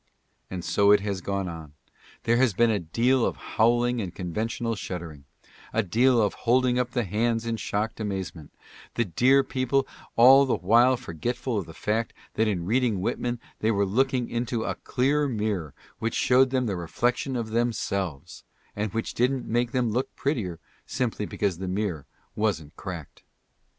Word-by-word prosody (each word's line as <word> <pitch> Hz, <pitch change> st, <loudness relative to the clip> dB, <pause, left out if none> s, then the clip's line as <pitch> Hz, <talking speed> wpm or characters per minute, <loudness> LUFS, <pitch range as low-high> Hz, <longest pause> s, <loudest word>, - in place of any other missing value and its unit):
And 90 Hz, -1 st, -5 dB
so 100 Hz, 0 st, +3 dB
it 105 Hz, -1 st, +6 dB
has 100 Hz, -2 st, -3 dB
gone 100 Hz, 0 st, -2 dB
on; 80 Hz, -4 st, -8 dB, 0.5 s
there 115 Hz, +1 st, +3 dB
has 125 Hz, -6 st, +3 dB
been 120 Hz, +2 st, +4 dB
a 105 Hz, -, +1 dB
deal 115 Hz, +10 st, +1 dB
of -, -, 0 dB
howling 120 Hz, +1 st, +1 dB
and 90 Hz, -4 st, -6 dB
conventional 110 Hz, +6 st, -2 dB
shuddering 85 Hz, -7 st, -7 dB, 0.3 s
— -, -, -23 dB
a 115 Hz, -, +2 dB
deal 120 Hz, +6 st, +3 dB
of 105 Hz, -2 st, +2 dB, 0.2 s
holding 125 Hz, 0 st, +4 dB
up 125 Hz, -1 st, 0 dB
the 120 Hz, -1 st, -1 dB
hands 115 Hz, +3 st, 0 dB
in 115 Hz, -1 st, -1 dB
shocked 110 Hz, +1 st, -2 dB
amazement 95 Hz, -7 st, -5 dB, 0.2 s
— -, -, -20 dB
the 120 Hz, -, +1 dB
dear 130 Hz, +10 st, +4 dB
people 130 Hz, +1 st, 0 dB, 0.3 s
all 135 Hz, +4 st, +7 dB
the -, -, +2 dB
while 120 Hz, +8 st, +4 dB
forgetful 120 Hz, -, -3 dB
of 95 Hz, -, -6 dB
the 80 Hz, -, -11 dB
fact 110 Hz, +6 st, -1 dB, 0.2 s
that 110 Hz, +1 st, +1 dB
in 90 Hz, -5 st, -1 dB
reading 115 Hz, -1 st, +1 dB
Whitman 120 Hz, +5 st, -2 dB, 0.2 s
they 110 Hz, -, +1 dB
were 100 Hz, -2 st, +2 dB
looking 125 Hz, +4 st, +1 dB
into 120 Hz, -1 st, -2 dB
a -, -, -1 dB
clear 145 Hz, +3 st, 0 dB
mirror 105 Hz, -, -2 dB, 0.2 s
which 115 Hz, 0 st, -2 dB
showed 130 Hz, +1 st, +4 dB
them 130 Hz, -1 st, 0 dB
the 100 Hz, -4 st, -1 dB
reflection 120 Hz, -, -1 dB
of 115 Hz, -2 st, -2 dB
themselves 100 Hz, -, -2 dB, 0.3 s
y 105 Hz, -, -4 dB
and 105 Hz, -2 st, -2 dB
which 115 Hz, -, -2 dB
didn't 125 Hz, +2 st, +1 dB
make 120 Hz, +1 st, 0 dB
them 125 Hz, -3 st, +1 dB
look 125 Hz, +4 st, -2 dB
prettier, 110 Hz, -, -2 dB, 0.3 s
simply 115 Hz, -5 st, -2 dB
because 95 Hz, -5 st, -1 dB
the 95 Hz, -, -4 dB
mirror 90 Hz, -5 st, -2 dB, 0.3 s
wasn't 85 Hz, -8 st, -1 dB
cracked. 85 Hz, -6 st, -8 dB
110 Hz, 175 wpm, -26 LUFS, 95-125 Hz, 0.5 s, all